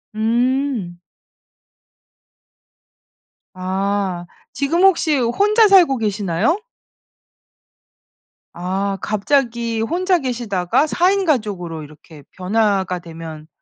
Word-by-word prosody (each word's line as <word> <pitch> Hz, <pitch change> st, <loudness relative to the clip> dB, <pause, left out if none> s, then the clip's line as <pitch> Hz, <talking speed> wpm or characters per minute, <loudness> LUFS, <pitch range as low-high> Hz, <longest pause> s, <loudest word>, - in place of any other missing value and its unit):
음. 235 Hz, -4 st, 0 dB, 2.5 s
아 190 Hz, -1 st, -2 dB, 0.3 s
지금 320 Hz, +6 st, 0 dB
혹시 330 Hz, -6 st, +4 dB
혼자 410 Hz, -, +3 dB
살고 355 Hz, -9 st, +5 dB
계시나요? 210 Hz, -, 0 dB, 2.0 s
아 195 Hz, +3 st, -2 dB
갑자기 235 Hz, +1 st, 0 dB
혼자 360 Hz, +9 st, +1 dB
계시다가 235 Hz, -, 0 dB
4 355 Hz, +4 st, +2 dB
인 395 Hz, -1 st, +1 dB
가족으로 195 Hz, -, -2 dB
이렇게 150 Hz, +1 st, -15 dB, 0.2 s
변화가 190 Hz, -1 st, 0 dB
되면 160 Hz, -2 st, -10 dB
215 Hz, 165 characters per minute, -19 LUFS, 185-280 Hz, 2.5 s, 살고